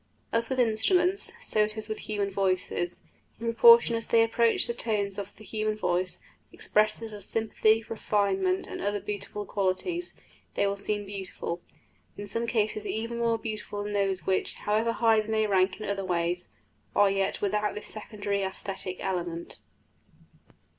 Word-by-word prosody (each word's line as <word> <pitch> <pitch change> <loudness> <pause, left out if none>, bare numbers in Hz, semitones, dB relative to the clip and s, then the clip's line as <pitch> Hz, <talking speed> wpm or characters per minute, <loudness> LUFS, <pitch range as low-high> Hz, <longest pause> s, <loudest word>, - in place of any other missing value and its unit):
As 230 0 +1
with 260 -1 -1
instruments, 345 - +3
so 225 - -1
it 215 +1 +2
is 215 -1 -4
with 215 - -6
bird 205 -2 -1
voices; 185 -2 -1 0.4
in 230 - -6
proportion 235 0 +7
as 230 - -3
they 230 -1 +5
approach 230 0 +3
the 235 - -2
tones 205 -4 -1
of 200 0 -7
the 215 - -14
human 215 0 -2
voice, 185 -2 0 0.3
expressive 215 +1 0
of 205 -1 -8
sympathy, 220 +1 +2
refinement, 195 -4 0
and - - -6
other 205 +1 0
beautiful 205 0 -5
qualities, 205 - -1 0.4
they - - +2
will 200 0 +1
seem 205 +1 -2
beautiful 190 -3 -5 0.6
in 205 - -5
some 230 +3 +2
cases 215 -2 0
even 230 +2 -3
more 230 -1 +2
beautiful 215 -2 -5
than 205 0 -4
those 195 -3 0
which, 190 -1 0
however 220 +2 +1
high 225 -2 +4
they 215 - -3
may 220 0 +2
rank 190 -1 +2
in 215 - -5
other 200 -1 -1
ways, 175 -1 -1 0.5
are 205 -1 +5
yet 195 0 0
without 210 +1 0
this 210 - -6
secondary 205 -2 -3
æsthetic 190 -1 -4
element. 175 -3 -3
210 Hz, 160 wpm, -28 LUFS, 195-225 Hz, 0.6 s, proportion